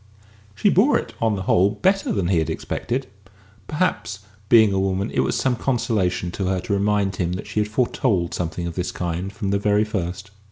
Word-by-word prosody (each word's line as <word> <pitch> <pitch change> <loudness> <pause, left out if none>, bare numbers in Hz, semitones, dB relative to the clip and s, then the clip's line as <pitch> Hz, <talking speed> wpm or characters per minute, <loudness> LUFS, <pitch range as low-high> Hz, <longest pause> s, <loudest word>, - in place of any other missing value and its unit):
She 95 - +3
bore - - +4
it, - - -6
on 110 -2 +2
the 95 - -4
whole, 95 +1 +4
better 195 - +1
than 95 -4 0
he 90 -4 +3
had 80 - -1
expected; 130 +3 -3 0.6
perhaps, 130 - -1 0.3
being 110 -4 +6
a 95 - +1
woman, 95 +2 -1
it - - -1
was - - +1
some 130 -2 +1
consolation 110 -8 0
to 95 +1 -3
her 95 0 0
to 100 - -2
remind 100 -1 +1
him 90 -1 -1
that 95 - -5
she - - -2
had 105 0 0
foretold 105 -6 0
something 85 0 -3
of 85 - -4
this 90 +1 -3
kind 90 +2 -3
from 100 -1 -3
the 100 - +1
very 105 +1 +2
first. 95 -2 -4
100 Hz, 205 wpm, -22 LUFS, 90-110 Hz, 0.6 s, being